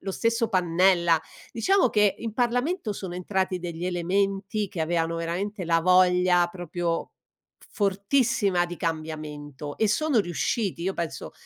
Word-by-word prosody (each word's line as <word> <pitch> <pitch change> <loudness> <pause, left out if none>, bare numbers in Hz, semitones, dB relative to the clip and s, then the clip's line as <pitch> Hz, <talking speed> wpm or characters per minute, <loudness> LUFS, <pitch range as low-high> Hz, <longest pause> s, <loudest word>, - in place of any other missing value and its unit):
lo 195 - -4
stesso 230 +1 0
Pannella. 175 -1 +3 0.3
Diciamo 370 - +2
che 210 -3 +2
in 225 -2 -5
Parlamento 245 - 0
sono 185 -3 -6
entrati 185 0 -1
degli 175 0 -5
elementi, 195 +3 -1
che 175 - -6
avevano 165 0 0
veramente 180 +4 -3
la 165 0 +2
voglia 180 0 +4
proprio 175 -1 -3 0.6
fortissima 200 -2 +1
di 175 0 -7
cambiamento 150 -3 -5
e 220 - +2
sono 290 +4 +2
riusciti. 190 0 -1
Io 190 +2 0
penso 170 -3 -5
185 Hz, 130 wpm, -26 LUFS, 170-205 Hz, 0.6 s, voglia